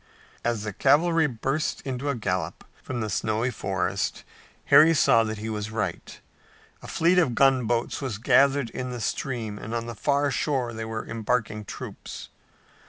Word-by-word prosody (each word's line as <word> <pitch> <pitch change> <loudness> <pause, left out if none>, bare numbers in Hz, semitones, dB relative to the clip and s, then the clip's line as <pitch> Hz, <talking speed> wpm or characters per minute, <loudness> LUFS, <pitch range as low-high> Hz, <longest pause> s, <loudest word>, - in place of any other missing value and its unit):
As 120 -3 -1
the 105 -2 -4
cavalry 160 - +3
burst 135 +4 -2
into 135 +1 -3
a 140 - 0
gallop 90 -7 -3 0.2
from 120 -2 -4
the 110 - -1
snowy 110 +5 0
forest 95 -5 -2 0.4
Harry 165 +2 +7
saw 115 -5 +5
that 110 -1 -3
he 110 +2 -5
was 105 -1 -3
right. 110 -1 -4 0.6
A - - -10
fleet 175 +3 +3
of 135 -9 +2
gunboats 125 -3 +2
was 130 -7 -3
gathered 135 +2 +3
in 125 0 -4
the 125 -1 -5
stream 115 -2 -3
and 110 +2 -5
on 115 0 -2
the 120 - -5
far 140 +4 +1
shore 130 -4 -1
they 110 0 -5
were 110 0 -4
embarking 110 -1 -2
troops. - - -8
120 Hz, 165 wpm, -26 LUFS, 110-140 Hz, 0.6 s, Harry